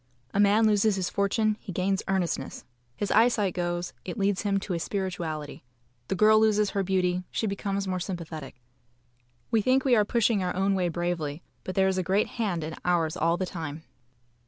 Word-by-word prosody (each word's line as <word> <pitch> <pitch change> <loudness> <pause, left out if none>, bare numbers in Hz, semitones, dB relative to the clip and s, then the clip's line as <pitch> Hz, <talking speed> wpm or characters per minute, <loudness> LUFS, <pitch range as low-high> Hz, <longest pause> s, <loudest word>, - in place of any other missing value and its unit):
A 200 - 0
man 205 +2 +5
loses 210 -1 +3
his 180 -2 -2
fortune; 210 +2 +1
he 195 - -8
gains 190 +2 0
earnestness. 175 -8 -2 0.3
His 205 - -2
eyesight 220 -4 +3
goes; 175 0 -2
it 185 - -6
leads 200 -1 +1
him 200 -2 +1
to 190 - -4
a 170 - -1
spirituality. 170 -7 -4 0.4
The - - -1
girl 215 +3 +6
loses 210 -2 +3
her 200 - 0
beauty; 180 -1 0
she - - -2
becomes 200 -1 -2
more 185 -1 -1
sympathetic. 165 -6 -6 1.0
We 225 - +3
think 255 +5 +2
we 255 -3 +5
are 210 - +4
pushing 225 -1 +2
our 180 - -2
own 195 +1 +2
way 180 -2 +1
bravely, 170 -3 -3 0.2
but 185 - -5
there 190 0 +4
is 190 -1 +1
a - - 0
great 195 +4 +1
Hand 195 -8 -2
in 160 +1 -5
ours 170 -2 +1
all 170 -1 +1
the 185 - -1
time. 160 -3 -6
190 Hz, 190 wpm, -27 LUFS, 175-205 Hz, 1.0 s, girl